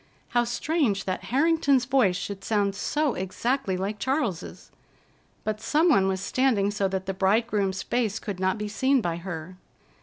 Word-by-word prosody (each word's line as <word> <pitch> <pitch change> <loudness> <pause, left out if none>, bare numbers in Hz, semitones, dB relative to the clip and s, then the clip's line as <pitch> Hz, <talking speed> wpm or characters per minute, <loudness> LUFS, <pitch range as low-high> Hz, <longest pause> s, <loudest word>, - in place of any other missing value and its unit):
How 240 0 +2
strange 240 - 0
that 185 - -3
Harrington's 280 -2 +2
voice 250 -8 +3
should 195 +1 -5
sound 205 -2 +1
so 295 +7 0
exactly 195 +2 -1
like 200 +3 -3
Charles's! 260 - -2 0.7
But 215 0 -3
some 315 +8 +3
one 195 -11 +4
was 190 -1 0
standing 210 -2 +1
so 200 -1 0
that 190 0 -3
the 195 - -2
bridegroom's 195 -1 +1
face 225 -4 0
could 205 -4 -5
not 190 +1 +1
be 210 0 -3
seen 260 +6 +2
by 170 -4 -2
her. 175 0 -7
205 Hz, 160 wpm, -26 LUFS, 190-260 Hz, 0.7 s, one